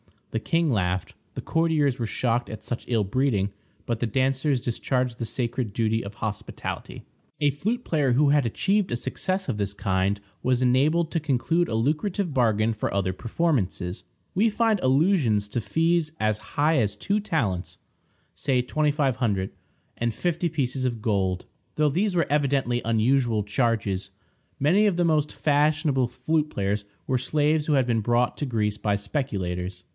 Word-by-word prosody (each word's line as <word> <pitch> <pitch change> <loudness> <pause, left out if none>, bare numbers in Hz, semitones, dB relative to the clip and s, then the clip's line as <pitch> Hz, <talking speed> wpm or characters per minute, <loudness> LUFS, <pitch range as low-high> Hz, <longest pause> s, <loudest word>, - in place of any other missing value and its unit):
The 115 - -1
king 165 +5 +1
laughed; 95 -4 -1 0.2
the - - -4
courtiers 155 -5 +1
were 115 - 0
shocked 120 +1 0
at 110 -1 -8
such 120 - -5
ill 115 -4 +2
breeding, 100 -2 +1 0.3
but 115 -2 -2
the 120 - 0
dancers 130 +3 +1
discharged 125 +1 -1
the 115 - -2
sacred 120 -2 -3
duty 110 +1 0
of 100 +1 -8
hospitality. 105 -2 -5 0.4
A 145 -1 +4
flute 215 - -2
player 145 - +1
who 140 +3 +4
had 145 -2 +3
achieved 195 - +1
a - - +1
success 185 +9 -2
of 115 - -1
this 100 -1 -2
kind 95 0 0 0.2
was 130 0 +1
enabled 150 +7 +3
to 165 - 0
conclude 155 +4 +1
a 110 - -2
lucrative 155 - 0
bargain 115 -3 +2
for 110 - -2
other 100 -1 +1
performances. 110 - -1 0.3
We 215 +5 +3
find 220 -1 +2
allusions 130 - +2
to 120 - -2
fees 165 +4 +1
as 110 -1 +1 0.2
high 155 +2 +3
as 105 -3 0
two 200 - 0
talents 115 - -2 0.6
(say 130 -3 0
$2500) 130 -9 0 0.5
and 120 -1 -1
fifty 175 0 0
pieces 135 -5 -2
of 120 -3 -2
gold, 95 -4 0 0.3
though 150 -1 +3
these 185 +6 0
were 170 -3 +3
evidently 140 -4 +1
unusual 115 0 +2
charges. 105 -4 -1 0.5
Many 190 +9 +4
of 200 - +1
the 175 0 +2
most 155 -2 +2
fashionable 150 -3 +2
flute 155 +4 -1
players 100 -1 -1 0.2
were 130 - +1
slaves 150 +3 +1
who 150 - +1
had 135 -3 +3
been 115 -2 +1
brought 120 +2 +1
to 145 - -2
Greece 105 -5 -1
by 105 -1 0
speculators. 95 -6 -3
130 Hz, 160 wpm, -25 LUFS, 110-155 Hz, 0.6 s, A